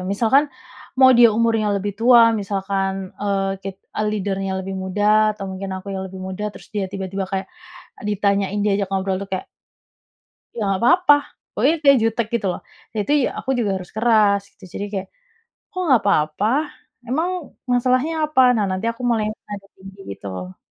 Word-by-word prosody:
Misalkan, 230 Hz, +9 st, +2 dB, 0.5 s
mau 260 Hz, 0 st, +7 dB
dia 240 Hz, -1 st, +7 dB
umurnya 225 Hz, -2 st, +1 dB
lebih 200 Hz, +1 st, -2 dB
tua, 235 Hz, -1 st, +6 dB
misalkan, 195 Hz, -1 st, -2 dB
eee, 195 Hz, -1 st, -1 dB
kit 195 Hz, -1 st, -5 dB, 0.2 s
ah, 215 Hz, -, 0 dB
leader-nya 195 Hz, -2 st, -2 dB
lebih 190 Hz, 0 st, -5 dB
muda 210 Hz, +3 st, +2 dB
atau 200 Hz, -, -7 dB
mungkin 190 Hz, +1 st, -6 dB
aku 190 Hz, +1 st, -8 dB
yang 190 Hz, 0 st, -4 dB
lebih 190 Hz, 0 st, -10 dB
muda, 190 Hz, +3 st, -4 dB
terus -, -, -13 dB
dia 205 Hz, -2 st, -2 dB
tiba-tiba 195 Hz, 0 st, -4 dB
kayak 190 Hz, 0 st, -4 dB, 0.6 s
ditanyain, 200 Hz, 0 st, 0 dB
diajak 200 Hz, -1 st, +1 dB
ngobrol 190 Hz, 0 st, 0 dB
tuh 200 Hz, -, -6 dB
kayak 190 Hz, -, -3 dB, 1.1 s
"ya -, -, -4 dB
nggak 195 Hz, +2 st, -1 dB
papa," 350 Hz, +3 st, +6 dB, 0.4 s
pokoknya 270 Hz, +10 st, +2 dB
kayak 280 Hz, -2 st, +6 dB
jutek 225 Hz, 0 st, 0 dB
gitu 225 Hz, -4 st, 0 dB
loh. -, -, -8 dB, 0.3 s
Jati 215 Hz, +6 st, -1 dB, 0.3 s
aku 265 Hz, -, -4 dB
juga 220 Hz, -4 st, 0 dB
harus 185 Hz, -1 st, -8 dB
keras 215 Hz, -3 st, +4 dB
gitu, -, -, -16 dB
jadi 200 Hz, -, -3 dB
kayak, 190 Hz, -2 st, -4 dB, 0.6 s
"Kok 370 Hz, -3 st, -4 dB
nggak 260 Hz, -6 st, +4 dB
papa? 155 Hz, +1 st, +1 dB, 0.6 s
Emang, 315 Hz, +9 st, 0 dB, 0.4 s
masalahnya 255 Hz, +5 st, +2 dB
apa?" 300 Hz, -3 st, +3 dB
nah 215 Hz, -, +1 dB
nanti 185 Hz, +3 st, -3 dB
aku 230 Hz, -, -12 dB
mulai 225 Hz, -2 st, +1 dB, 0.2 s
nada 205 Hz, -1 st, -7 dB
tinggi 195 Hz, +1 st, -13 dB, 0.2 s
gitu -, -, -17 dB
loh. 90 Hz, 0 st, -7 dB
205 Hz, 170 wpm, -21 LUFS, 195-230 Hz, 1.1 s, mau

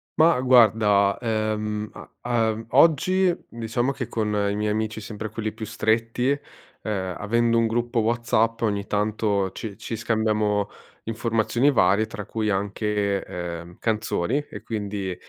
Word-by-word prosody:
Ma 160 Hz, -2 st, +5 dB
guarda, 110 Hz, -5 st, +5 dB
ehm, 110 Hz, -2 st, -2 dB, 0.3 s
a 120 Hz, -2 st, +1 dB
e -, -, +1 dB
mhmm, 110 Hz, +1 st, -8 dB
oggi, 170 Hz, +6 st, +4 dB
diciamo 115 Hz, +3 st, -1 dB
che 135 Hz, -3 st, -5 dB
con 110 Hz, -2 st, -2 dB, 0.2 s
i 100 Hz, -, -1 dB
miei 105 Hz, 0 st, 0 dB
amici 110 Hz, +1 st, -2 dB
sempre 110 Hz, 0 st, -6 dB
quelli 110 Hz, +1 st, -3 dB
più 110 Hz, 0 st, -7 dB
stretti, 115 Hz, +3 st, 0 dB
uhm, 105 Hz, -8 st, -5 dB
avendo 115 Hz, +2 st, +2 dB
un 115 Hz, -, +2 dB
gruppo 120 Hz, +1 st, 0 dB
WhatsApp 115 Hz, 0 st, +1 dB
ogni 100 Hz, -3 st, -1 dB
tanto 105 Hz, -2 st, 0 dB
ci 100 Hz, 0 st, -7 dB
ci 115 Hz, -, -5 dB
scambiamo 105 Hz, -2 st, 0 dB, 0.3 s
informazioni 115 Hz, +3 st, +1 dB
varie, 105 Hz, -3 st, +3 dB
tra 105 Hz, -2 st, -7 dB
cui 110 Hz, 0 st, -2 dB
anche, 100 Hz, 0 st, -1 dB
ehm, 85 Hz, 0 st, -7 dB
canzoni 110 Hz, +1 st, 0 dB
e -, -, -9 dB
quindi, 100 Hz, -4 st, -3 dB
110 Hz, 140 wpm, -24 LUFS, 105-115 Hz, 0.3 s, Ma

